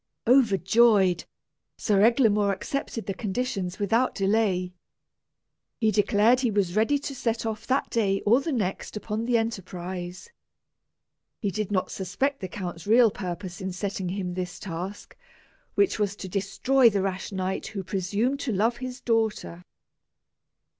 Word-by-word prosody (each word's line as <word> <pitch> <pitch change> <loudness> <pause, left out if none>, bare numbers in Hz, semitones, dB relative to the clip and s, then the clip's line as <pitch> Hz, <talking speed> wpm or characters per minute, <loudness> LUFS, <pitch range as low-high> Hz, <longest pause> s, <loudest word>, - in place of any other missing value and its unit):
Overjoyed, 215 -5 +4 0.5
Sir 200 -3 +2
Eglamour 215 -3 +4
accepted 230 +2 -4
the 195 - -2
conditions 195 -3 -3
without 225 +5 +1
delay. 195 -3 +1 1.1
He 220 -2 +3
declared 210 +4 +3
he 255 -2 +1
was 200 -4 0
ready 225 +7 +3
to 280 0 -5
set 230 -3 -2
off 220 -1 -4
that 265 +1 0
day 195 -4 +1
or 235 +6 +4
the 320 - -3
next 210 -4 -2
upon 215 +1 -3
the 240 -1 +3
enterprise. 185 - -5 1.1
He 200 - -1
did 210 +2 -3
not 185 -2 0
suspect 275 +8 -2
the 185 - -4
count's 180 -2 -6
real 230 0 +6
purpose 180 -1 -6
in 190 0 -3
setting 190 -1 -3
him 185 -1 -3
this 180 0 -4
task, 185 +2 -7 0.6
which 400 - +2
was 200 -1 0
to 190 - -7
destroy 230 +7 +3
the 200 -3 0
rash 195 +1 -3
knight 190 0 -2
who 195 -2 -5
presumed 205 +9 -1
to 275 - -2
love 225 +4 +1
his 255 +1 -6
daughter. 220 -6 -1
205 Hz, 145 wpm, -26 LUFS, 190-230 Hz, 1.1 s, real